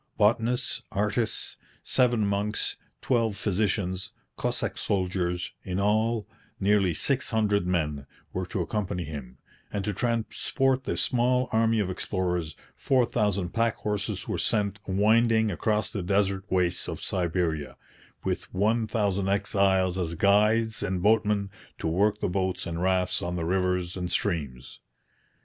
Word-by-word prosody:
Botanists, 115 Hz, +3 st, +2 dB
artists, 105 Hz, +3 st, -1 dB, 0.3 s
seven 120 Hz, -4 st, +2 dB
monks, 100 Hz, +1 st, -1 dB, 0.3 s
twelve 115 Hz, -5 st, +1 dB
physicians, 100 Hz, -2 st, -1 dB, 0.2 s
Cossack -, -, -2 dB
soldiers 90 Hz, -2 st, -1 dB
in 90 Hz, 0 st, -2 dB
all, 110 Hz, +2 st, +1 dB, 0.3 s
nearly 100 Hz, -2 st, +3 dB
six 130 Hz, -, 0 dB
hundred 105 Hz, -4 st, +1 dB
men 75 Hz, -6 st, -1 dB, 0.3 s
were 90 Hz, -1 st, -2 dB
to 95 Hz, 0 st, -2 dB
accompany 100 Hz, -1 st, -2 dB
him; 70 Hz, -5 st, -8 dB, 0.3 s
and 100 Hz, -2 st, -2 dB
to 105 Hz, -, -1 dB
transport 130 Hz, +4 st, 0 dB
this -, -, 0 dB
small 125 Hz, +1 st, +2 dB
army 115 Hz, 0 st, +3 dB
of 95 Hz, -3 st, 0 dB
explorers, 90 Hz, -4 st, -2 dB, 0.2 s
four 130 Hz, -2 st, +2 dB
thousand 100 Hz, -5 st, 0 dB
pack 115 Hz, +3 st, +1 dB
horses 105 Hz, -1 st, -3 dB
were -, -, -2 dB
sent 105 Hz, -1 st, 0 dB
winding 110 Hz, +3 st, +3 dB
across 105 Hz, +3 st, 0 dB
the 100 Hz, -, -3 dB
desert 95 Hz, +1 st, +1 dB
wastes 90 Hz, -1 st, 0 dB
of -, -, -5 dB
Siberia, 85 Hz, -6 st, -1 dB, 0.5 s
with -, -, -3 dB
one 110 Hz, +4 st, +1 dB
thousand 100 Hz, -3 st, 0 dB
exiles 95 Hz, -2 st, +2 dB
as 85 Hz, -2 st, -2 dB
guides 105 Hz, +4 st, +3 dB
and 95 Hz, -1 st, -2 dB
boatmen 105 Hz, -2 st, +2 dB, 0.3 s
to -, -, -7 dB
work 100 Hz, +6 st, +2 dB
the -, -, +1 dB
boats 95 Hz, 0 st, -1 dB
and 85 Hz, -1 st, -4 dB
rafts 95 Hz, 0 st, +1 dB
on 90 Hz, 0 st, -3 dB
the 85 Hz, -2 st, -2 dB
rivers 90 Hz, 0 st, 0 dB
and 90 Hz, -2 st, -3 dB
streams. 70 Hz, -12 st, -2 dB
100 Hz, 135 wpm, -27 LUFS, 90-110 Hz, 0.5 s, nearly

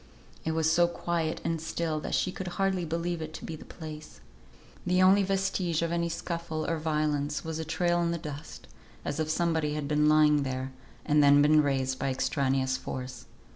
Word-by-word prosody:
It 160 Hz, -, -1 dB
was 160 Hz, 0 st, +2 dB
so 175 Hz, +1 st, +4 dB
quiet 170 Hz, -2 st, -2 dB
and 165 Hz, -1 st, -1 dB
still 160 Hz, -1 st, -2 dB
that -, -, -2 dB
she 185 Hz, -, +1 dB
could 185 Hz, 0 st, -6 dB
hardly 190 Hz, -2 st, +1 dB
believe 170 Hz, +1 st, -2 dB
it 155 Hz, 0 st, -6 dB
to -, -, -7 dB
be 165 Hz, -, -5 dB
the -, -, -11 dB
place. 155 Hz, -2 st, -9 dB, 0.6 s
The 180 Hz, 0 st, +1 dB
only 190 Hz, +2 st, +6 dB
vestige 190 Hz, -4 st, 0 dB
of 170 Hz, -, -1 dB
any 170 Hz, 0 st, 0 dB
scuffle 170 Hz, -2 st, -4 dB
or 165 Hz, -1 st, -1 dB
violence 150 Hz, -2 st, -1 dB
was 160 Hz, 0 st, -3 dB
a 160 Hz, -, -3 dB
trail 175 Hz, +2 st, +1 dB
on 170 Hz, -1 st, +1 dB
the 170 Hz, -, -1 dB
dust, 150 Hz, -, -8 dB, 0.4 s
as 145 Hz, -, -3 dB
if 155 Hz, -1 st, -1 dB
somebody 160 Hz, -2 st, 0 dB
had 150 Hz, -2 st, -3 dB
been 150 Hz, 0 st, +3 dB
lying 150 Hz, -1 st, +5 dB
there, 130 Hz, -1 st, -3 dB, 0.3 s
and 150 Hz, 0 st, +4 dB
then 145 Hz, 0 st, +6 dB
been 155 Hz, +1 st, +6 dB
raised 135 Hz, -2 st, 0 dB
by 135 Hz, -, 0 dB
extraneous 130 Hz, 0 st, 0 dB
force. 125 Hz, -1 st, -7 dB
160 Hz, 195 wpm, -29 LUFS, 150-170 Hz, 0.6 s, only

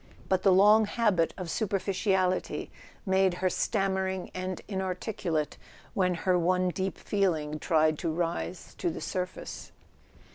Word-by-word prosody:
But 190 Hz, -1 st, +2 dB
the 195 Hz, -, +5 dB
long 210 Hz, +4 st, +6 dB
habit 205 Hz, -7 st, +2 dB
of 185 Hz, -, -4 dB
super¬ 195 Hz, +3 st, -1 dB
ficiality 190 Hz, -1 st, 0 dB, 0.4 s
made 190 Hz, -2 st, +3 dB
her 185 Hz, 0 st, 0 dB
stammering 190 Hz, -2 st, -1 dB
and 185 Hz, 0 st, -4 dB
inarticulate 185 Hz, -4 st, -2 dB, 0.4 s
when 180 Hz, -2 st, +1 dB
her 180 Hz, +1 st, +2 dB
one 180 Hz, +1 st, +2 dB
deep 190 Hz, +2 st, -3 dB
feeling 160 Hz, -7 st, 0 dB
tried 155 Hz, -1 st, +2 dB
to 165 Hz, -, -1 dB
rise 170 Hz, +2 st, -3 dB
to -, -, +1 dB
the 165 Hz, -, -5 dB
surface. 185 Hz, -1 st, -5 dB
185 Hz, 135 wpm, -29 LUFS, 175-195 Hz, 0.4 s, long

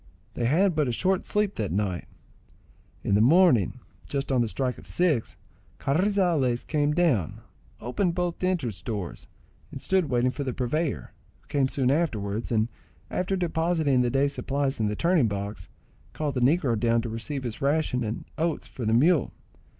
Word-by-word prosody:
They 120 Hz, -, -2 dB
had 175 Hz, +9 st, +3 dB
but 150 Hz, -3 st, +2 dB
a -, -, 0 dB
short 185 Hz, +9 st, 0 dB
sleep 210 Hz, -1 st, +1 dB
that 105 Hz, -5 st, -2 dB
night. 95 Hz, -2 st, -2 dB, 1.0 s
In -, -, 0 dB
the 105 Hz, -, +4 dB
morning, 135 Hz, -, +4 dB, 0.3 s
just 140 Hz, -1 st, -2 dB
on 130 Hz, -2 st, +3 dB
the 120 Hz, -, +1 dB
strike 125 Hz, +3 st, -2 dB
of -, -, -14 dB
six, 160 Hz, -10 st, 0 dB, 0.4 s
Carrizales 165 Hz, -6 st, +1 dB
came 150 Hz, -1 st, +1 dB
down, 150 Hz, -, +1 dB, 0.4 s
opened 170 Hz, -, -1 dB
both 175 Hz, 0 st, -2 dB
entrance 140 Hz, -, -1 dB
doors, 100 Hz, -6 st, -5 dB, 0.4 s
and -, -, -7 dB
stood 185 Hz, -5 st, +1 dB
waiting 125 Hz, 0 st, +2 dB
for 145 Hz, -, -4 dB
the 130 Hz, -2 st, -3 dB
purveyor, 140 Hz, +6 st, -2 dB, 0.3 s
who -, -, -31 dB
came 140 Hz, -2 st, +2 dB
soon 130 Hz, -1 st, +1 dB
afterwards; 115 Hz, -9 st, -1 dB
and 110 Hz, -1 st, +2 dB, 0.4 s
after 185 Hz, +2 st, -1 dB
depositing 160 Hz, -6 st, +1 dB
the 125 Hz, -, +2 dB
day's 140 Hz, +3 st, +1 dB
supplies 140 Hz, -1 st, -1 dB
in 110 Hz, -, +1 dB
the 105 Hz, -, -1 dB
turning 170 Hz, -, +3 dB
box, 100 Hz, -2 st, -5 dB, 0.4 s
called 150 Hz, -2 st, -2 dB
the 125 Hz, -, -1 dB
negro 135 Hz, -2 st, +3 dB
down 115 Hz, 0 st, +2 dB
to 120 Hz, -, -4 dB
receive 125 Hz, +5 st, -4 dB
his 120 Hz, -3 st, -5 dB
ration 140 Hz, -3 st, +1 dB
and 110 Hz, 0 st, -4 dB
oats 165 Hz, -1 st, -1 dB
for 120 Hz, -4 st, -5 dB
the 110 Hz, -, +3 dB
mule. 155 Hz, +3 st, +3 dB
135 Hz, 175 wpm, -26 LUFS, 115-165 Hz, 1.0 s, the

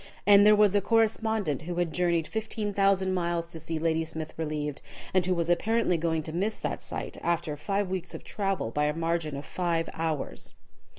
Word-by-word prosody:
And 205 Hz, 0 st, +7 dB
there 210 Hz, -, +8 dB
was 210 Hz, -2 st, +5 dB
a 205 Hz, -, +3 dB
correspondent 220 Hz, -, +1 dB
who 175 Hz, +2 st, -5 dB
had 175 Hz, -2 st, -1 dB
journeyed 170 Hz, -2 st, +1 dB
15,000 200 Hz, -4 st, 0 dB
miles 170 Hz, -2 st, 0 dB
to 165 Hz, -, -4 dB
see 160 Hz, +1 st, -3 dB
Ladysmith 160 Hz, -1 st, -1 dB
relieved, 150 Hz, -2 st, -3 dB, 0.3 s
and 185 Hz, -1 st, +4 dB
who 185 Hz, -, +2 dB
was 170 Hz, -1 st, -1 dB
apparently 215 Hz, +3 st, +2 dB
going 160 Hz, -1 st, 0 dB
to 155 Hz, -, -6 dB
miss 205 Hz, +5 st, -1 dB
that -, -, -3 dB
sight, -, -, -5 dB
after 165 Hz, -3 st, -1 dB
five 195 Hz, +6 st, -1 dB
weeks 185 Hz, -1 st, -4 dB
of -, -, -8 dB
travel, 195 Hz, -, -2 dB
by 150 Hz, +4 st, +1 dB
a 150 Hz, +1 st, 0 dB
margin 165 Hz, -3 st, -1 dB
of 140 Hz, -, -7 dB
five 170 Hz, -2 st, -1 dB
hours. 160 Hz, -3 st, -4 dB
170 Hz, 185 wpm, -28 LUFS, 160-200 Hz, 0.3 s, there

